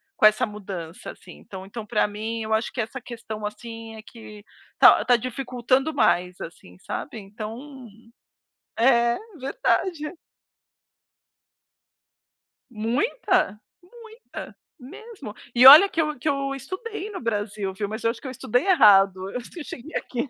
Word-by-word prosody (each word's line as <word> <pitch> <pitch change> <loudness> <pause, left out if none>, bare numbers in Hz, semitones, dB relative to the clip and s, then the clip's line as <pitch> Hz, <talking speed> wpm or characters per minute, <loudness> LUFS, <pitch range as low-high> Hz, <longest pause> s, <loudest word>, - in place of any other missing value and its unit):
com - - +3
essa 215 +4 +5
mudança, 190 -5 -8
assim. 180 - -15
Então 190 -1 -10
então 215 +2 -8
pra 215 0 +1
mim, 220 +2 -5
eu 220 0 -2
acho 220 - -2
que 240 - -2
essa 225 +5 -6
questão, 220 -3 -7
assim, 225 +1 -8
é 220 - -9
que 215 -3 -13 0.4
tá - - +7
tá 245 -1 +5
dificultando 255 +3 -1
mais, 180 -8 +1
assim, 125 - -10
sabe, 225 - -6
então 230 +6 -9 0.9
é 235 -1 +4 0.2
verdade. 315 - -1 2.6
Muita, 245 - 0 0.2
muita, 450 +4 -12 0.2
mesmo. 370 - -11 0.2
E 250 +1 +5
olha 310 +8 +11
que 325 - 0
eu 300 -1 -2
que 250 - -6
eu 275 -1 -1
estudei 375 - -7
no 390 - -7
Brasil, 205 -3 -3
viu, 205 +1 -4
mas 220 +1 -6
eu 230 - +2
acho 235 - -11
que - - -8
eu 260 - -5
estudei 245 - -1
errado, 200 - +6 0.4
se 350 - -10
eu - - -6
cheguei 290 +3 -10
aqui 255 +2 -3
235 Hz, 145 wpm, -24 LUFS, 215-285 Hz, 2.6 s, olha